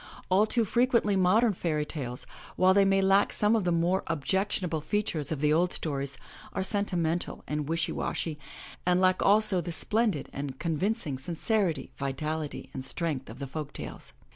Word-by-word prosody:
All 195 +4 +4
too 230 0 +2
frequently 235 -2 +2
modem 205 +5 +4
fairy 155 -4 -1
tales, 130 -5 -4 0.3
while 185 0 +5
they 200 0 +5
may 195 0 +3
lack 195 +1 +4
some 210 +2 +2
of 215 -5 0
the 175 - +2
more 175 +3 +2
objectionable 170 +1 0
features 165 -6 -1
of 150 -3 -2
the 150 0 +3
old 175 +3 +2
stories, 140 -3 -3 0.4
are 190 - -1
sentimental 180 -5 -1
and 150 0 -3
wishy 165 0 0
washy, 155 -3 -3 0.4
and 180 0 +3
lack 185 0 +3
also 210 -1 +5
all - - +1
the 170 +1 -5
splendid 210 -1 0
and 140 -1 -5
convincing 165 - -1
sincerity, 175 - -1
vitality 150 +2 -3
and 130 - -5
strength 145 - -2
of 110 - -9
the 140 - -5
folk 150 +2 -6
tales. - - -7
175 Hz, 170 wpm, -28 LUFS, 150-195 Hz, 0.4 s, while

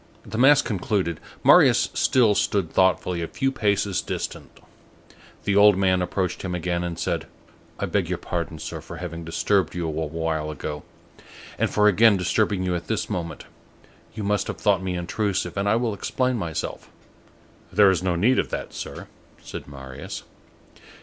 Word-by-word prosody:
The 110 - -5
mass 135 +3 +6
concluded, 95 -5 -1 0.2
Marius - - +6
still 120 -5 +3
stood 100 -4 0
thoughtfully 90 -1 +2
a 85 - -2
few 135 +9 -1
paces 100 -5 0
distant; - - -6 0.8
the 100 - +1
old 105 -1 +7
man 95 -1 +2
approached 90 0 -2
him 90 -2 -3
again 85 0 -1
and 85 -1 -4
said:— - - -2 0.5
"I - - -2
beg - - -1
your - - -1
pardon, 85 -2 -4
sir, 80 +1 -6
for 85 +2 -9
having 85 -1 -6
disturbed 95 +4 0
you 85 -1 -2
a - - -2
while 80 0 -2
ago, 75 0 -5 0.8
and - - +2
for 105 0 +3
again 105 +1 +5
disturbing 95 +1 +1
you 90 -1 0
at 85 -1 -4
this 110 -1 -2
moment; 85 -5 -4 0.7
you 110 - -4
must 105 +1 0
have - - -4
thought 100 -3 +2
me 95 -1 -3
intrusive, 90 0 -2
and 100 +1 0
I 105 - +4
will 115 -2 0
explain 125 +5 -1
myself." 85 -8 -4 0.8
"There 100 -2 +6
is 90 - 0
no 90 -2 0
need 115 +10 +3
of - - -1
that, - - -5
Sir," - - -7 0.4
said - - -8
Marius. 65 -1 -8
95 Hz, 170 wpm, -24 LUFS, 85-105 Hz, 0.8 s, old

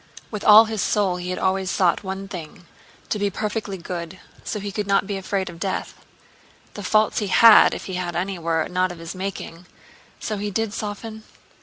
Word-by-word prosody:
With 210 -2 -5
all 215 +2 +9
his 220 -2 -3
soul 195 -3 +1
he 180 0 -5
had 185 - -2
always 190 0 0
sought 180 +1 +2
one 190 0 -5
thing—to 180 +4 -9
be 200 0 +1
perfectly 210 -1 -3
good—so 180 +4 -7
he 200 0 -5
could 205 0 -3
not 200 0 +2
be 200 0 -3
afraid 195 0 -2
of 170 -2 -9
death. 190 +1 -3 0.8
The 205 - -7
faults 215 +2 +2
he 210 - -2
had—if 225 +3 +6
he 190 - -6
had 180 -1 -3
any—were 170 -3 -1
not 185 0 0
of 175 - -9
his 165 0 -7
making. 185 -2 -6 0.5
So 215 - -3
he 205 +1 -3
did 215 +1 -2
soften?... 220 +1 -6
195 Hz, 180 wpm, -23 LUFS, 180-210 Hz, 0.8 s, all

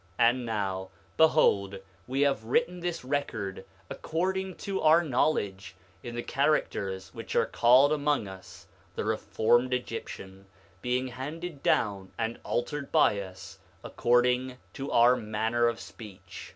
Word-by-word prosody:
9:32 115 -1 +6
And 125 0 -3
now, 95 -4 -2 0.3
behold, 100 -11 +4 0.3
we 135 +2 -1
have 135 -6 +1
written 180 - +1
this 170 -5 -4
record 110 -9 -3 0.2
according 190 - -2
to 195 -1 -4
our 160 +2 +5
knowledge, 105 - -1 0.3
in 120 -1 -7
the 120 - -3
characters 100 -10 -1
which - - -7
are - - +4
called 130 +5 +5
among 145 -6 0
us 95 -1 -12 0.3
the - - -3
reformed 120 +3 +2
Egyptian, 100 -5 -7 0.3
being 125 +1 -1
handed 150 +5 -6
down 100 -3 0
and 115 +1 -3
altered 145 +3 -3
by 100 - +4
us, 95 -1 -10 0.2
according 125 +1 +1 0.2
to 135 +1 -5
our 120 +2 +6
manner 115 +1 0
of 115 -1 -2
speech. 95 -7 -11
120 Hz, 135 wpm, -28 LUFS, 105-145 Hz, 0.3 s, 9:32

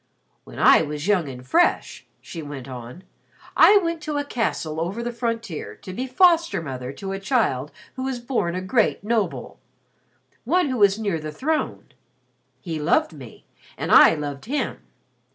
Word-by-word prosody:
"When - - -12
I - - +6
was 150 +1 -4
young 180 -8 +2
and 125 -1 -9
fresh," 130 - +1
she 165 - -8
went 145 -3 -8
on. 125 +6 -9 0.5
"I 415 - +7
went 335 -4 -1
to 300 -1 -3
a 290 - 0
castle 165 - -2
over 195 +8 -3
the 240 - -3
frontier 230 -7 -4
to 185 - -10
be 255 +7 -4
foster 335 - +3
mother 130 -5 -6
to 195 +7 -6
a 195 - -4
child 195 - 0 0.2
who 260 - -6
was 265 -1 -2
born 240 -8 -2
a 185 - -2
great 215 +1 +1
noble 220 -1 -2 0.8
one 360 -4 +1
who 255 - -2
was 200 -2 +4
near 200 -7 -2
the 155 0 -6
throne. 305 - -2 0.7
He 160 0 -4
loved 155 +2 +1
me 130 -7 -13 0.3
and - - -3
I - - +8
loved 145 -2 -6
him. 285 +5 -2
195 Hz, 170 wpm, -23 LUFS, 150-250 Hz, 0.8 s, I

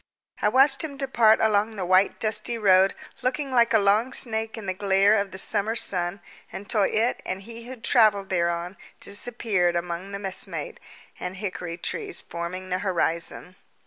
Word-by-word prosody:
I 210 - +3
watched 270 +4 +4
him 285 -3 -6
depart 240 -5 +3
along 215 0 +1
the 190 -3 -3
white 185 +2 +3
dusty 225 +2 +1
road, 195 -2 +4 0.3
looking 265 +2 -2
like 240 -1 +3
a 225 - +5
long 215 +5 +2
snake 220 -3 -1
in 220 - -7
the 185 - -2
glare 195 +1 +3
of 200 -2 0
the 190 - -9
summer 210 +3 0
sun, 180 -3 -1 0.3
until 205 +2 -2
it 225 +5 +1
and 185 +1 -5
he 230 +2 -10
who 260 - -7
travelled 215 -5 +3
thereon 170 +1 -1 0.2
disappeared 200 -4 +1
among 175 +2 -4
the 200 - -4
messmate 200 - -4 0.4
and 180 +1 -5
hickory 180 -4 -5
trees 410 - -4
forming 175 +2 -6
the 180 0 -1
horizon. 180 -1 -2
205 Hz, 165 wpm, -25 LUFS, 185-230 Hz, 0.4 s, a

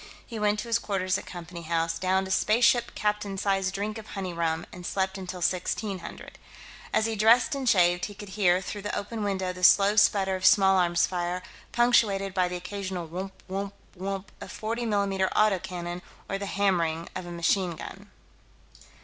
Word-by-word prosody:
He 230 -3 -7
went 210 0 +2
to - - -8
his 230 0 +2
quarters 190 -3 -1
at - - -12
Company 170 -1 -8
House, 165 0 -1
downed 190 +1 +1
a - - -6
spaceship 235 +4 +3
captain's 210 -2 -1
size 195 -1 +1
drink 210 +3 -3
of 215 - -11
honey 190 -4 -5
rum, 165 0 -1
and 180 - -9
slept 190 +1 -1
until 185 -2 -6
1600. 185 +2 -3 0.5
As 220 - +2
he 225 0 -1
dressed 230 +8 +5
and 270 -3 0
shaved, 175 -2 +4
he 205 - -8
could 205 0 -9
hear, 185 -2 +2
through 205 +2 -5
the 205 - -3
open 220 +2 -4
window, 190 -2 -1
the 180 0 -10
slow 200 +3 +6
sputter 195 -2 +4
of 185 - -6
small 195 0 +6
arms' 175 -1 +3
fire, 180 0 -3 0.3
punctuated 215 -5 +3
by 185 -1 +2
the 180 - -4
occasional 185 -1 -5
whump 190 +3 -7
whump 195 +1 -4 0.2
whump 195 +2 -5
of - - -8
40 230 +2 -3
mm 195 -3 +1
auto 210 -3 +4
cannon 175 0 -5 0.3
or 195 - -3
the 200 - -4
hammering 170 -5 0
of 185 -1 -5
a - - -7
machine 170 +1 +1
gun. - - -10
190 Hz, 185 wpm, -27 LUFS, 180-205 Hz, 0.5 s, slow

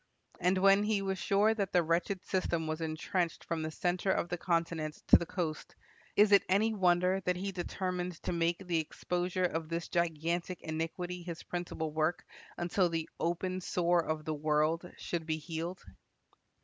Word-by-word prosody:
And 180 +2 +2
when 195 +1 +6
he 210 -2 +1
was 190 -1 -2
sure 200 +5 +3
that 200 -4 -2
the 175 - +5
wretched 170 +3 0
system 175 -4 0
was 155 +1 -3
entrenched 165 +2 -1
from 165 -1 -2
the 155 - -2
center 180 +4 -1
of 175 - +1
the 175 - -2
continent 165 -3 0
to - - +10
the 170 - -5
coast, 165 -5 -3 0.4
is 210 0 +6
it 200 - +8
any 215 +4 +3
wonder 180 -1 +3
that 180 0 +1
he 195 +2 -3
determined 180 0 -3
to - - -1
make 170 0 +1
the 170 -2 +1
exposure 180 +3 -1
of 165 -2 -2
this 170 0 -3
gigantic 170 +1 -1
iniquity 165 +3 -3
his 170 -1 -7
principal 170 -3 -4
work 155 +2 0 0.3
until 175 +1 +1
"the 165 -1 -2
open 185 +2 -1
sore 175 -1 +2
of 155 -1 -3
the 155 - -1
world" 155 +3 +1
should 165 -2 -3
be 155 -1 0
healed? 165 +3 -5
175 Hz, 175 wpm, -32 LUFS, 165-185 Hz, 0.4 s, to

